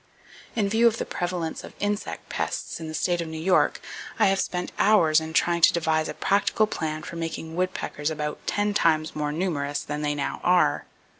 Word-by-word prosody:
In 215 -3 +1
view 225 +3 +4
of 230 -1 +2
the - - -3
prevalence 175 -2 -3
of - - -11
insect 205 0 -3
pests - - -3
in 160 - -6
the 155 - -5
state 175 +2 0
of 165 - -4
New 160 0 -6
York, 180 +4 +2 0.4
I 215 -4 +4
have 195 0 +1
spent 180 0 -2
hours 170 -7 +5
in 160 0 -6
trying 170 +1 +2
to - - +7
devise 160 -2 +1
a - - -5
practical 205 +2 +2
plan 155 -6 -4
for 170 - -7
making 165 -1 -5
woodpeckers 180 -4 -2
about 150 -1 -3
ten 205 0 +1
times 160 -5 +2
more 150 -1 -1
numerous 150 -4 -1
than 150 0 -4
they 145 -1 0
now 140 - -3
are. 180 0 +3
165 Hz, 200 wpm, -25 LUFS, 155-190 Hz, 0.4 s, to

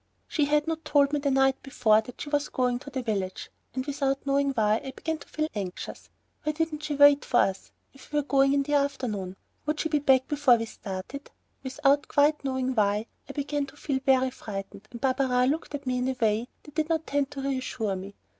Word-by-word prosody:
She 300 - +1
had 295 +1 +2
not 325 0 -3
told 285 -1 +3
me 295 - +2
the 285 0 0
night 270 0 +3
before 220 -5 +3
that 240 +2 -12
she 290 - -5
was 290 -1 +1
going 250 -1 0
to 285 - -10
the 260 -2 -4
village, 195 -5 -3 0.2
and 260 0 -2
without 275 -1 -1
knowing 280 0 +2
why, 220 -4 +2
I 265 - -6
began 320 -1 -3
to - - -13
feel 310 0 -2
anxious. 190 -4 -6 0.3
Why 305 - -1
didn't 310 -1 -2
she 300 -1 -3
wait 285 0 +7
for 240 - +3
us, 195 0 -2 0.2
if 275 - -16
we 295 - 0
were 295 - +2
going 275 -1 +3
in 280 0 +2
the 295 +1 -3
afternoon? 250 -10 -1 0.3
Would 305 0 0
she 320 - 0
be 300 -1 +2
back 265 -2 +4
before 290 -4 +4
we 230 - -3
started? 210 +6 -7 0.3
Without 280 +1 +1 0.4
knowing 260 -1 -1
quite - - -13
why, 210 +1 +2 0.2
I - - -5
began 285 0 -2
to 280 - -15
feel 275 -2 -1
very 260 -1 +3
frightened, 200 -3 -7
and 235 - -9
Barberin 260 0 +2
looked 310 -1 -4
at 280 - -7
me 250 -1 0
in 250 - 0
a 260 -1 -2
way 220 +1 +1 0.2
that 295 - -14
did 310 +1 -1
not 320 -1 0
tend 285 -1 0
to 275 - -6
reassure 255 -6 -2
me. 195 +2 -8
270 Hz, 225 wpm, -27 LUFS, 240-290 Hz, 0.4 s, wait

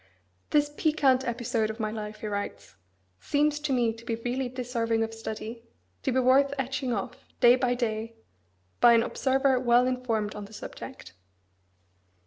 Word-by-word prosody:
"This 295 -1 +2
piquant 280 -5 +3
episode 235 -2 -1
of 220 +2 -6
my 215 -1 -1
life," 215 -1 -6
he - - -5
writes, 200 - -5 0.4
"seems 295 0 +1
to 300 -1 -2
me 240 -3 +2
to 230 +1 -13
be 235 -1 -2
really 245 +3 -2
deserving 235 -3 -1
of 225 0 -4
study; 225 +1 -6 0.4
to 265 - 0
be 260 - +2
worth 275 +2 +4
etching 265 -1 -2
off, 200 -4 -4 0.2
day 240 0 +7
by 250 -1 +1
day, 230 -1 -2 0.6
by 240 -1 +7
an 230 0 +5
observer 265 0 +1
well 245 0 +4
informed 235 -5 -1
on 210 -1 -7
the 210 - -15
subject." 90 - -9
240 Hz, 160 wpm, -28 LUFS, 225-260 Hz, 0.6 s, day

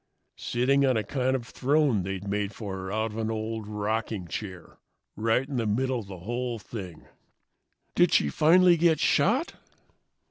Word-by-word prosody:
"Sitting 135 +3 +2
on 130 -3 +3
a 110 - 0
kind 130 +4 0
of 120 -3 -3
throne 135 -4 +1
they'd 95 +1 -5
made 100 0 -2
for 100 -4 -5
her 95 0 -6
out 110 +1 -1
of 105 - -8
an 110 0 -1
old 110 -1 -4
rocking 105 -2 -2
chair. 90 -4 -7 0.4
Right 115 +5 +1
in 135 -3 -4
the 115 -2 0
middle 130 +4 0
of 105 - -9
the 95 -1 -8
whole 120 +6 -3
thing." 95 -6 -9 0.9
"Did - - +4
she 75 - +3
finally 175 - +5
get 165 -2 +3
shot?" 250 - +2
110 Hz, 170 wpm, -27 LUFS, 100-130 Hz, 0.9 s, finally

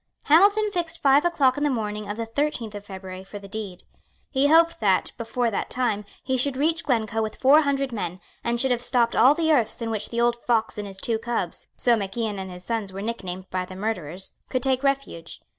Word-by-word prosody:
Hamilton 410 +7 +5
fixed 345 -3 -2
five 280 +3 +4
o'clock 280 -7 +3
in - - -1
the 295 - +3
morning 210 -4 -3
of 205 - -4
the 230 - -2
thirteenth 230 -2 -2
of 205 -1 -7
February 190 -1 -8
for 195 +2 -9
the 200 -1 -10
deed. 195 -3 -6 0.5
He 275 0 +3
hoped 330 +2 +4
that, 195 -4 +2
before 230 0 -1
that 200 - -2
time, 225 -5 -1 0.2
he 260 0 0
should 260 +1 +1
reach 320 +4 +1
Glencoe 225 -4 0
with 220 -1 -3
four 280 +4 +6
hundred 275 -2 0
men, 185 -5 -4 0.2
and 235 0 0
should 265 +1 +2
have 240 -1 +1
stopped 245 -2 +2
all 260 +6 +6
the 320 -1 +1
earths 240 -8 +2
in 230 -1 -3
which 215 -1 -3
the 235 - -3
old 240 0 +2
fox 225 -3 +1
and 205 - -4
his 195 -1 -8
two 225 +3 -1
cubs, 230 -7 -3
so 240 -1 +3
Mac 195 -1 -4
Ian 215 -4 -1
and 190 0 -5
his 180 0 -9
sons 220 -2 -2
were 195 +1 -6
nicknamed 190 -5 -5
by 185 0 -1
the 185 +1 -9
murderers, 190 -4 -3 0.2
could 255 -1 -1
take 260 -1 +2
refuge. 275 -12 -2
230 Hz, 225 wpm, -24 LUFS, 205-270 Hz, 0.5 s, four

